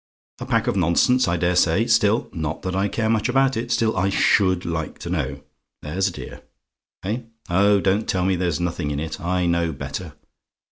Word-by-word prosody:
A - - -6
pack - - +1
of - - 0
nonsense, 95 +8 +3
I 85 0 +1
dare 90 +1 +1
say; 90 +5 +3
still 115 -1 +2
not 80 -3 -4
that 95 0 -2
I 95 +1 +1
care 110 +2 -1
much 110 +1 +1
about 135 +1 +2
it, 120 +2 -3
still 115 -1 +1
I 95 +1 +1
SHOULD 95 -2 +2
like 80 -2 -3
to 85 - -7
know. 70 -5 -3 0.4
There's 90 +7 -1
a - - -2
dear. - - -9 0.6
Eh: 105 +6 -2 0.3
oh, 100 +3 +4
don't 100 +3 0
tell 90 -1 +1
me 95 0 +2
there's 85 -3 -1
nothing 85 -4 -2
in 70 -1 -2
it: 80 0 -5
I 90 +1 0
know 85 -1 +1
better. 70 - -6
95 Hz, 200 wpm, -22 LUFS, 85-105 Hz, 0.6 s, oh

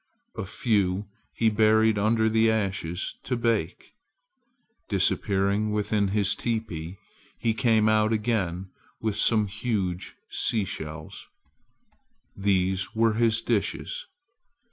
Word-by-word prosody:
A - - -4
few 100 -4 0 0.3
he 115 -1 +1
buried 110 0 +4
under 110 +2 +2
the 110 0 +3
ashes 95 -5 -2
to 125 - -2
bake. 115 -1 -1 1.0
Disappearing 100 +1 +1
within 105 -1 +1
his 100 0 +1
teepee, 100 -7 -4 0.4
he 115 -1 0
came 110 -2 +3
out 110 0 +3
again 100 -5 -1 0.3
with 110 -2 -1
some 110 0 +3
huge 100 -3 -3
seashells. 90 -8 -3 1.1
These 95 0 0
were 115 0 +3
his 115 0 +1
dishes. 305 - -2
105 Hz, 100 wpm, -26 LUFS, 95-110 Hz, 1.1 s, buried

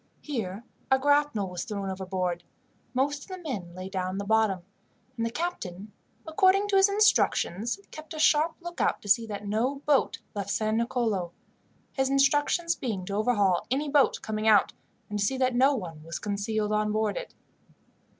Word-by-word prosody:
Here 220 -7 -4 0.3
a 265 - +5
grapnel 285 -7 +2
was 180 -1 -5
thrown 200 -4 -4
overboard, 185 -2 -3 0.5
most 285 +2 0
of - - -12
the 375 -1 -6
men 210 - -6
lay 185 +1 -6
down 185 -1 -3
in - - -4
the 200 - -3
bottom, 215 -4 +2 0.5
and 230 - -2
the 230 - 0
captain, 215 - -5 0.3
according 380 +5 +3
to 400 - +2
his 390 +1 +6
instructions, 390 - +2
kept 310 +1 -9
a - - -6
sharp 310 +1 +3
lookout 345 0 -1
to - - -10
see 225 +3 +3
that 205 -1 -6
no 250 +7 -1
boat 290 -3 +2 0.2
left 200 -1 -4
San 215 +1 0
Nicolo 225 -7 -1 0.6
his 265 -1 0
instructions 290 +5 +2
being 210 - -4
to 195 - -5
overhaul 205 -4 +2
any 285 +4 0
boat 280 -1 +4
coming 215 0 -2
out, 215 -2 +5 0.3
and 210 0 -3
to 200 - +2
see 265 +6 0
that 255 -1 +1
no 265 +4 +4
one 165 -9 -6
was 165 +1 -5
concealed 210 +1 -2
on 210 0 +1
board 215 -1 0
it. - - -7
220 Hz, 180 wpm, -27 LUFS, 200-285 Hz, 0.6 s, his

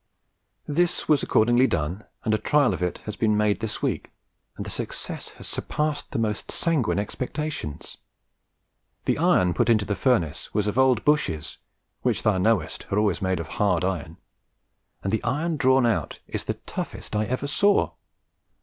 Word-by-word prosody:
This 175 +4 +1
was 150 -3 +4
accordingly 120 +4 +4
done, 85 +4 -2 0.2
and 110 - +1
a 110 - +2
trial 145 -3 +3
of - - -5
it 90 -1 -1
has 105 - -4
been 105 -1 +2
made 105 -1 +2
this 110 -1 -3
week, - - -1 0.5
and - - -5
the - - -4
success - - -4
has - - -8
surpassed 150 -1 -2
the - - -4
most 110 -2 -1
sanguine 160 - +1
expectations. 125 - -4 1.1
The - - +1
iron 90 -1 +4
put 90 - +1
into 110 -3 +4
the 105 - -1
furnace 85 - 0
was 105 -1 +1
old 130 -3 +3
Bushes, 90 - +1 0.4
which - - 0
thou 105 -4 +3
knowest 105 -4 0
are 100 - +1
always 105 -2 +2
made 95 -2 0
of 85 - -4
hard 90 -4 +1
iron, 85 -3 -3 0.9
and 95 - -1
the 110 - 0
iron 160 +5 0
drawn 130 -2 +4
out 115 -2 0
is - - -4
the - - -2
toughest - - -6
I 105 +1 +1
ever 130 +5 -2
saw. 200 +9 +3
110 Hz, 170 wpm, -25 LUFS, 95-135 Hz, 1.1 s, was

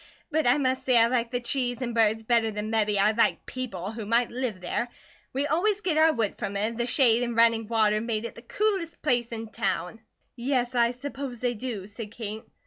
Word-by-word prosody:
But 310 -2 +1
I 245 +3 +5
must 260 -2 0
say 255 -2 +4
I 230 - +7
like 235 -1 0
the 245 0 -1
trees 245 -1 -1
and 240 -1 -3
birds 225 -1 +2
better 230 -1 +2
than 210 +1 -4
mebby 210 -2 +2
I'd 210 +3 +2
like - - +2
people 205 -7 -5
who 225 -2 -6
might 235 +2 +2
live 240 -6 -3
there; 180 +6 -2 0.4
we 275 +2 0
always 385 +8 +1
git 360 -6 0
our 320 +1 +6
wood 225 -8 -1
from 200 0 -3
it, - - -1
and 225 +2 -1
the 240 - 0
shade 240 -3 +4
an' 240 -1 -2
running 230 -1 +4
water 215 -2 +2
make 225 -1 -2
it 235 - -5
the - - -12
coolest 380 - -2
place 240 -5 +1
in 225 -1 -5
town." 195 +1 -2 0.3
"Yes, 250 0 -1
I 235 -1 +3
suppose 255 0 -6
they 245 0 0
do," 225 -4 -5
said 210 +1 -8
Kate. 220 -1 -5
235 Hz, 225 wpm, -27 LUFS, 220-255 Hz, 0.4 s, I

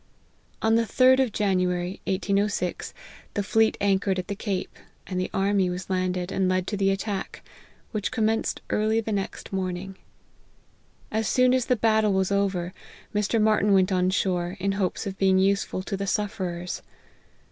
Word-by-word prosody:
On 220 0 +3
the 230 0 +3
third 260 +2 +5
of 260 -4 +2
January 185 -2 0
1806, 200 -1 -1 0.4
the 205 - 0
fleet 220 +2 +2
anchored 195 -1 +1
it 185 +2 -4
the 200 - -2
cape, 195 -2 -3 0.3
and 185 -1 -3
the 185 - -2
army 195 -1 +1
was 180 +1 -5
landed, 185 0 -1
and 190 -1 +1
led 185 -1 +1
to 205 - -3
he 195 -1 +2
attack, 195 0 -3 0.5
which 210 -3 -2
commenced 225 -2 0
early 215 +1 +2
the 225 -1 -3
next 200 -1 -4
morn 185 -2 -1
ng. 190 +1 -8 1.2
As 220 0 0
soon 255 0 +4
as 255 -2 +1
the 250 - +3
battle 220 -2 +2
was 190 0 +1
over, 190 -3 0 0.4
Mr. 210 +2 +1
Martyn 210 -1 +3
went 190 0 +4
on 185 -1 +2
shore, 180 -2 -1
in 195 +1 0
hopes 195 -2 -1
of 195 -1 -5
being 190 -1 +4
useful 195 -1 +1
to 195 - -3
the 195 0 -3
suf 205 +1 -1
"erers. 175 -2 -4
195 Hz, 170 wpm, -26 LUFS, 185-210 Hz, 1.2 s, third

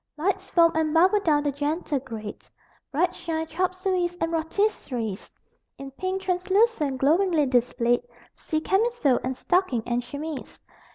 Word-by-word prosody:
Lights 385 +4 -1
foam 335 -1 +5
and 315 0 0
bubble 370 +5 +5
down 305 -6 +2
the 290 - 0
gentle 290 +1 -2
grade: 220 -4 -8 0.5
Bright 325 +5 +1
shine 320 -1 -3
chop 365 +3 -1
sueys 365 -2 -1
and 330 0 -1
rôtisseries; 315 - -2 0.5
In 275 0 -8
pink 375 +6 -3
translucence 370 - +1
glowingly 325 +2 +3
displayed 245 -1 +2 0.3
See 310 0 -3
camisole 385 - +2
and 255 0 -3
stocking 355 - +1
and 240 0 -1
chemise. 290 +3 -7
320 Hz, 135 wpm, -25 LUFS, 275-370 Hz, 0.5 s, foam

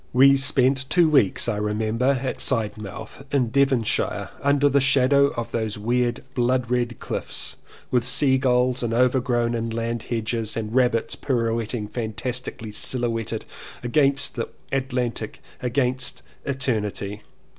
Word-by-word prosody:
We 135 +2 +7
spent 135 -1 +2
two 175 -2 +4
weeks 135 -12 +3
I 110 -3 0
remember 110 +5 0
at 130 - -2
Sidmouth 110 0 -3
in 125 -5 +1
Devonshire 135 -5 +1
under 140 0 +3
the 140 0 +3
shadow 140 +1 +4
of 120 - -4
those 110 -2 -2
weird 120 +3 0
blood 125 -1 0
red 120 -1 0
cHffs, - - -3 0.4
with 125 -2 +2
sea 130 +2 +3
gulls 125 -1 +2
and 115 -1 -1
overgrown 120 -1 +2
inland 115 0 -2
hedges 115 -1 -3
and 110 -1 -4
rabbits 120 -3 +2
pirouetting, 115 -3 -1
fantastically 115 0 -4
sil 120 +3 0
houetted 115 -2 -2 0.4
against 140 +2 +2
the 115 - -4 0.2
Atlantic 130 -3 -2
— - - -26
against 125 0 0 0.2
Eter 130 -5 0
nity. 105 0 -5
125 Hz, 135 wpm, -23 LUFS, 115-130 Hz, 0.4 s, We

